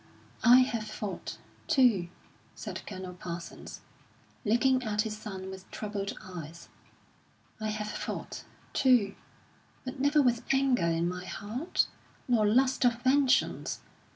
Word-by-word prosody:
"I 245 +1 +9
have 230 -4 0
fought, 210 -2 -5 0.3
too," 230 - +4 0.5
said - - -6
Colonel 185 -2 -6
Parsons, 175 -1 -7 0.6
looking 255 +4 +3
at 210 -3 0
his 220 -2 -4
son 190 -3 -7
with 190 0 -10
troubled 205 -2 -4
eyes 170 -2 -9 0.9
"I 215 - -2
have 210 0 -3
fought, - - -5 0.3
too, 245 -7 +4 0.7
but 260 +2 -6
never 285 +3 +4
with 245 -4 +3
anger 270 -8 +3
in 165 +1 +1
my 180 +1 -4
heart, 230 - -1 0.4
nor 225 -4 +4
lust 260 +5 +3
of 240 -1 +3
vengeance. 270 +1 +2
215 Hz, 125 wpm, -30 LUFS, 190-255 Hz, 0.9 s, I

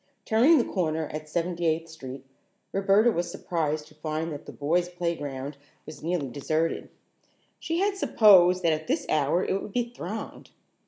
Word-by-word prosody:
Turning 250 +9 +5
the - - +3
corner 160 -4 -1
at 155 0 -7
Seventy 170 +1 -1
eighth 165 +1 0
Street, 135 -4 -9 0.5
Roberta 200 +4 +4
was 175 -3 -2
surprised 155 -4 -2
to 155 - -18
find 155 +1 -3
that 145 - -8
the - - -6
boys' 175 +5 0
playground 145 -6 -4 0.3
was 155 - -10
nearly 165 -3 -1
deserted. 155 +6 -2 0.7
She 330 +2 -1
had 400 0 +1
supposed 185 - +6
that 165 -2 +4
at 155 0 -4
this - - 0
hour 155 +4 +2
it 195 - -1
would 205 - -8
be 240 -1 -1
thronged. 215 0 -7
165 Hz, 165 wpm, -27 LUFS, 155-190 Hz, 0.7 s, supposed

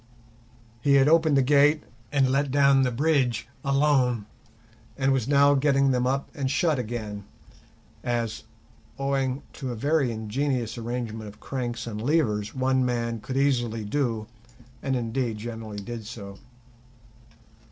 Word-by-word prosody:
He 140 +3 +3
had 135 0 +5
opened 160 -2 +4
the 135 - +4
gate 145 +3 +4 0.3
and 135 -3 +3
let 140 +1 +1
down 140 0 +4
the 130 - +2
bridge 125 -3 +1 0.2
alone, 135 -5 +2 0.7
and 135 0 +2
was 130 -3 0
now 140 0 +5
getting 140 -1 +3
them 125 -1 +1
up 135 +1 -1
and 140 -5 -2
shut 155 0 +1
again 110 -3 -5 0.8
(as, 115 -2 -2 0.5
owing 135 -1 -1
to 130 -3 -5
a - - -4
very 140 +2 +1
ingenious 115 +1 -2
arrangement 115 -2 -4
of 105 0 -12
cranks 120 -3 -4
and 110 -2 -5
levers, 110 -7 0
one 130 0 +2
man 115 -2 -1
could 130 +4 -5
easily 120 -6 +1
do, 115 -2 -1 0.6
and 135 -1 -1
indeed 115 -1 -2
generally 110 -1 -6
did 115 +2 -6
do). 100 -3 -9
130 Hz, 140 wpm, -26 LUFS, 115-140 Hz, 0.8 s, had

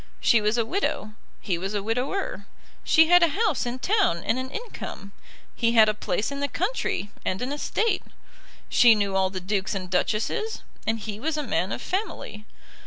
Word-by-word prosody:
She 230 - +4
was 210 +3 +1
a 230 - +2
widow; 225 - -2 0.3
he 180 -5 -1
was 195 +3 -3
a 200 - -1
widower. 245 - -2 0.4
She 320 0 +6
had 355 0 +7
a 335 - +6
house 405 - +1
in 240 +1 -3
town 375 - +1
and 250 - 0
an 260 0 -4
income. 445 - -7 0.4
He 230 0 +1
had 220 -2 +7
a 215 - +2
place 210 +2 -2
in 280 - -4
the 285 - 0
country 365 - -2
and 185 - -1
an 255 +2 -3
estate. 385 +7 0 0.7
She 235 -2 +6
knew 200 -2 -1
all 190 -1 +3
the 185 0 -5
dukes 190 +1 -2
and 185 -1 -5
duchesses, 220 - -1 0.2
and 225 +1 +1
he 210 -1 -6
was 310 +5 -1
a 300 - -1
man 195 -7 -1
of - - -4
family. 360 - -4
225 Hz, 190 wpm, -25 LUFS, 200-310 Hz, 0.7 s, had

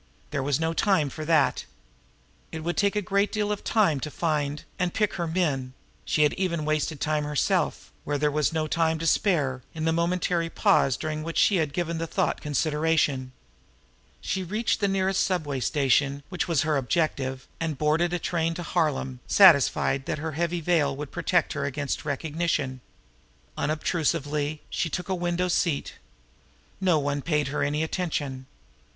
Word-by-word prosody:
There 140 - -1
was 140 +1 0
no 160 0 0
time 165 -7 +2
for 155 +2 -6
that. 155 -5 +2 0.9
It 160 -1 -6
would 175 +1 -1
take 200 0 +1
a 210 - 0
great 200 +2 +1
deal 210 -1 -1
of 205 - -3
time 195 -10 +2
to 150 - -4
find 150 -2 -1 0.2
and 180 -2 -1
pick 210 -2 +1
her 170 -2 -2
men; 145 -7 -1 0.3
she 150 - +2
had 150 - +3
even 170 -5 -1
wasted 155 0 -1
time 155 0 0
herself, 150 -2 0
where 145 - -1
there 150 +1 +1
was 150 +1 +1
no 160 -1 -1
time 160 +1 +1
to 165 - -4
spare, 150 -7 +1
in 160 0 -3
the 160 - +2
momentary 170 0 0
pause 135 -4 +3
during 155 0 -3
which 165 +1 -5
she 200 - +4
had 155 -4 0
given 170 0 -2
the 165 - -2
thought - - -1
consideration. 150 -3 0 0.9
She 190 - -2
reached 210 +6 -1
the 200 - +2
nearest 195 0 +1
subway 155 -7 -1
station, 140 +1 +1
which 180 0 -2
was 165 -4 +2
her 155 -2 +1
objective, 135 -2 -1
and 160 -3 -2
boarded 155 +4 +2
a 170 0 -1
Harlem 155 -6 0
train, 130 -2 -9
satisfied 140 -6 +5
that - - -1
her 160 +2 -4
heavy 170 +3 -1
veil 150 -4 +2
would 145 0 -6
protect 175 -4 +1
her 140 - -2
against 145 +2 -3
recognition. 145 -3 -2 0.7
Unobtrusively 150 -1 -1
she 165 - -2
took 180 +3 -4
a - - +1
window 175 0 0
seat. 170 -4 0 0.8
No 185 -4 +3
one 145 -1 -1
paid 150 -2 0
her 150 - -2
any 145 +2 0
attention. 145 -6 -3
155 Hz, 170 wpm, -26 LUFS, 145-175 Hz, 0.9 s, satisfied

